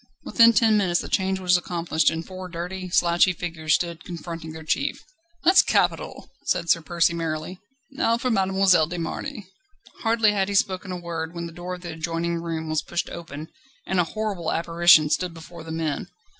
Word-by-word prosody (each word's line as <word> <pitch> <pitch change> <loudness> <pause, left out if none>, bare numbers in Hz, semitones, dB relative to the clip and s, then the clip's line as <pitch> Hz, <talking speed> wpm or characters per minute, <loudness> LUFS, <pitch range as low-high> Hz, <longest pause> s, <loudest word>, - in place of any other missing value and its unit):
Within 230 0 +6
ten 220 0 +4
minutes 180 -4 +1
the - - -7
change 190 -1 0
was 180 -1 +3
accomplished, 170 -2 0
and 165 0 -4
four 185 -1 -8
dirty, 180 +2 -5
slouchy 175 +1 +3
figures 160 -2 -1
stood 170 -2 -3
confronting 165 -2 -7
their 160 0 -9
chief. 280 - -1 0.4
"That's 370 +3 +7
capital!" - - -1 0.2
said 170 - +1
Sir 170 - +3
Percy 170 +1 +1
merrily. 165 +2 -4 0.3
"Now 270 -5 +1
for 250 +1 -1
Mademoiselle 190 -5 +3
de 175 +2 -5
Marny." 210 - -5 0.5
Hardly 225 -2 +3
had 200 -1 0
he 200 - -2
spoken 185 -2 -1
when 170 0 -4
the 170 - -7
door 175 +2 -6
of 180 - -13
the 175 -1 -6
adjoining 165 +1 -2
room 165 -1 -4
was 155 -1 0
pushed 175 - -3
open, 160 -2 -8 0.4
and 190 - 0
a - - +5
horrible 200 -4 -3
apparition 165 -2 +5
stood 180 -2 -1
before 165 0 -11
the 160 - -8
men. 160 -3 -2
175 Hz, 180 wpm, -24 LUFS, 165-190 Hz, 0.5 s, That's